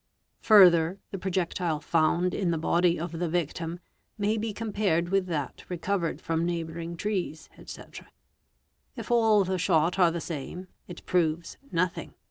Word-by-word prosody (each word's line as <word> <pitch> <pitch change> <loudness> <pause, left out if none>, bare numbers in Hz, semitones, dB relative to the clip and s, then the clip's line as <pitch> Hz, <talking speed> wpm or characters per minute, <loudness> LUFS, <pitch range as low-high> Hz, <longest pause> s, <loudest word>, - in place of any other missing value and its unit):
'. - - -50
Further, 180 -4 +6
the 195 - -5
projectile 175 -3 -1
found 170 +3 +1
in 190 -4 -1
the 165 - 0
body 170 +2 +2
of 170 +1 -4
the 175 -1 -1
victim 165 0 -2 0.4
may 210 +1 +1
be 220 0 -2
com 215 0 -5
pared 175 -5 +1
with 195 -1 +1
that 150 -6 -4
recovered 180 -1 -2
from 165 0 -1
neighbouring 170 0 -4
trees, 185 -6 -3
&c. - - -9 1.1
If - - -7
all 220 -3 +4
the 185 0 -2
shot 170 +1 +2
are 175 -2 +6
the 170 +1 -3
same, 170 +4 -6 0.2
it 175 - -10
proves 170 -2 0
nothing. 180 +1 -2
175 Hz, 155 wpm, -27 LUFS, 165-190 Hz, 1.1 s, Further